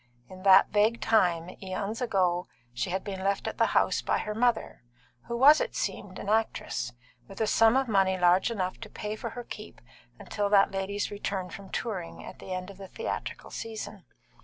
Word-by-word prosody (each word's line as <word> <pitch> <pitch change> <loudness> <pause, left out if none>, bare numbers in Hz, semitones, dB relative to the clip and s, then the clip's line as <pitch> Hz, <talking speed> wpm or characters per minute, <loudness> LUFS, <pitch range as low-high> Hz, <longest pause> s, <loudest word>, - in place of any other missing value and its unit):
In 185 0 -11
that 190 0 +6
vague 215 +3 +3
time, 180 -5 +2
eons 200 +4 -4
ago, 185 -6 +1 0.3
she 125 +1 -2
had 185 +1 -2
been 190 -2 -5
left 200 0 0
at - - -5
the - - +4
house - - +2
by - - +1
her 210 - -3
mother 230 0 0 0.5
(who 235 - -2
was, 290 +5 +7
it - - -3
seemed, - - -3
an - - -7
actress), 220 - -1 0.3
with 195 - -11
a 220 - +2
sum 225 +3 +4
of 265 -1 +1
money 195 -3 +2
large 180 +4 +4
enough 185 -5 -3
to 220 - -9
pay 210 +1 -5
for - - -5
her 245 - -7
keep 210 -2 -9 0.4
until 205 - -2
that 200 -1 +5
lady's 195 +1 -2
return 195 -3 -3
from 195 +1 -9
touring, 190 -8 -4
at - - -10
the - - -9
end 185 +1 -4
of 195 - -16
the 195 - -8
theatrical - - -5
season. 225 -1 -7
200 Hz, 195 wpm, -28 LUFS, 185-220 Hz, 0.5 s, was